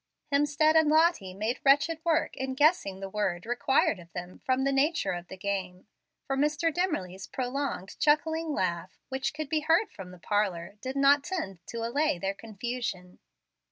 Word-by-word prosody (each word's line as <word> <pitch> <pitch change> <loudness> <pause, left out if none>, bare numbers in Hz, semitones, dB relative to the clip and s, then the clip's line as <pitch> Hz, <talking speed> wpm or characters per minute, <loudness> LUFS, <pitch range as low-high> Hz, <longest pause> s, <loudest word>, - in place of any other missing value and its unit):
Hemstead 295 +2 +3
and 315 -1 +5
Lottie 310 - +3
made 220 +5 -2
wretched 310 +4 +3
work 330 -1 +1
in 265 0 -3
guessing 270 - +2
the 195 - -4
word 190 -4 -1
required 245 -3 +2
of 170 -1 -14
them 180 0 -7
from 260 0 0
the 275 - +2
nature 300 +5 +1
of 175 0 -5
the 190 - -9
game; 185 -2 -3 0.4
for 270 - -1
Mr. 300 +3 +1
Dimmerly's 205 - -2
prolonged 260 -6 -3
chuckling 320 +2 +2
laugh, 185 -7 -2
which 265 0 -1
could 310 0 -5
be 310 +1 +1
heard 330 +7 +2
from 190 -2 -9
the 180 - -12
parlor, 190 -1 -1
did 260 +1 -4
not 275 +1 +5
tend 285 - -4
to 230 -1 -4
allay 280 - +1
their 195 +3 -2
confusion. 220 -3 -5
260 Hz, 170 wpm, -29 LUFS, 190-300 Hz, 0.4 s, and